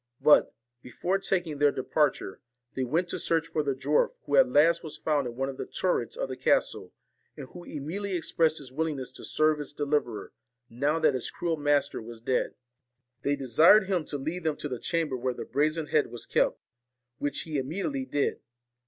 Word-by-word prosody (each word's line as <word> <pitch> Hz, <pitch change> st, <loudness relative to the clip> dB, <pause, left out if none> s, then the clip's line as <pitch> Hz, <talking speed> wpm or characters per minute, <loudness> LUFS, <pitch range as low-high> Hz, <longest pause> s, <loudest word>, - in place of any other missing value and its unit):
But, 150 Hz, -, +5 dB, 0.3 s
before 180 Hz, +10 st, -2 dB
taking 175 Hz, -6 st, -1 dB
their 145 Hz, 0 st, +5 dB
departure, 135 Hz, -6 st, 0 dB, 0.3 s
they 130 Hz, -, -2 dB
went 160 Hz, +8 st, 0 dB
to -, -, -3 dB
search 165 Hz, -1 st, +1 dB
for 155 Hz, -, -1 dB
the 140 Hz, -2 st, -1 dB
dwarf, 140 Hz, +3 st, +1 dB
who 145 Hz, -, 0 dB
at 135 Hz, -, +6 dB
last 160 Hz, +6 st, +4 dB
was 155 Hz, -, -7 dB
found 145 Hz, -4 st, 0 dB
in 120 Hz, -, -7 dB
one 135 Hz, +2 st, -1 dB
of 135 Hz, -1 st, -6 dB
the -, -, -5 dB
turrets 185 Hz, -, -1 dB
of -, -, -2 dB
the -, -, -5 dB
castle, -, -, +1 dB, 0.5 s
and -, -, -8 dB
who 175 Hz, -, -11 dB
immediately 180 Hz, +7 st, -4 dB
expressed 160 Hz, -2 st, +1 dB
his 135 Hz, -3 st, -9 dB
willingness 145 Hz, -3 st, -2 dB
to -, -, -12 dB
serve 155 Hz, 0 st, +2 dB
his 145 Hz, 0 st, -6 dB
deliverer, 145 Hz, -7 st, -2 dB, 0.4 s
now 140 Hz, +7 st, +1 dB
that 155 Hz, -3 st, +3 dB
his 130 Hz, -, -1 dB
cruel 170 Hz, -2 st, -2 dB
master 145 Hz, -1 st, +1 dB
was 115 Hz, 0 st, -9 dB
dead. 125 Hz, +3 st, -1 dB, 0.7 s
They 140 Hz, +3 st, +1 dB
desired 145 Hz, -, +6 dB
him 185 Hz, -4 st, 0 dB
to 145 Hz, -, -4 dB
lead 160 Hz, +6 st, -4 dB
them 155 Hz, -2 st, 0 dB
to -, -, -4 dB
the 125 Hz, -4 st, -5 dB
chamber 165 Hz, -5 st, -1 dB
where 125 Hz, 0 st, -2 dB
the -, -, -6 dB
brazen 155 Hz, +2 st, 0 dB
head 150 Hz, 0 st, +2 dB
was 120 Hz, -, -8 dB
kept, -, -, +1 dB, 0.6 s
which 145 Hz, -, -1 dB
he 150 Hz, -4 st, -2 dB
imme 155 Hz, +10 st, -4 dB
diately 270 Hz, -3 st, -3 dB
did. 145 Hz, -, 0 dB
150 Hz, 195 wpm, -28 LUFS, 135-165 Hz, 0.7 s, at